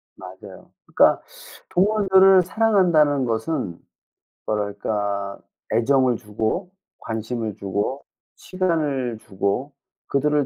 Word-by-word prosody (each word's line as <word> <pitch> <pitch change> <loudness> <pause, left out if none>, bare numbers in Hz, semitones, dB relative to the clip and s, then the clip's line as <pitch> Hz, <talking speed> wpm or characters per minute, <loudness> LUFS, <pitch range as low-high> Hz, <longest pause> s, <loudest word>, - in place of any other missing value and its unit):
맞아요. - - -12
그러니까 - - +3 0.5
동물들을 190 -1 +5
사랑한다는 175 - +3
것은 110 - -2 0.7
뭐랄까 100 -1 -2 0.4
애정을 125 +1 +3
주고 115 - -3 0.3
관심을 110 -1 -4
주고 105 +7 -3 0.3
시간을 150 -10 -2
주고 100 +8 -2 0.3
그들을 145 +1 +1
130 Hz, 225 characters per minute, -22 LUFS, 105-170 Hz, 0.7 s, 동물들을